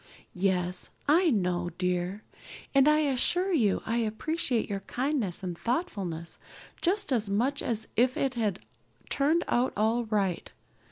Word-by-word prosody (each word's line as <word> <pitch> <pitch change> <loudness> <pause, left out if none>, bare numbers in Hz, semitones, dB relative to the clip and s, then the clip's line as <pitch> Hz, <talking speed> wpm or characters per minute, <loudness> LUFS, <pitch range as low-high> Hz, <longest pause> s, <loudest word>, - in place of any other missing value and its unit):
"Yes, 180 -1 0 0.2
I 335 +4 +5
know, 180 - 0
dear. 180 +2 -1 0.5
And 275 0 +5
I 305 0 +5
assure 345 +7 +2
you 220 - +2
I 230 +1 0
appreciate 235 +3 -1
your 200 -2 -3
kindness 240 - -2
and 180 -2 -3
thoughtfulness 195 - -3 0.4
just 370 -4 +1
as 215 -4 0
much 245 +8 +1
as 220 -2 -1
if 250 +2 +3
it 270 -1 0
had 215 -6 -1 0.5
turned 315 +5 +2
out 245 +2 +1
all 225 +3 +2
right. 200 -5 -1
225 Hz, 135 wpm, -29 LUFS, 190-280 Hz, 0.5 s, I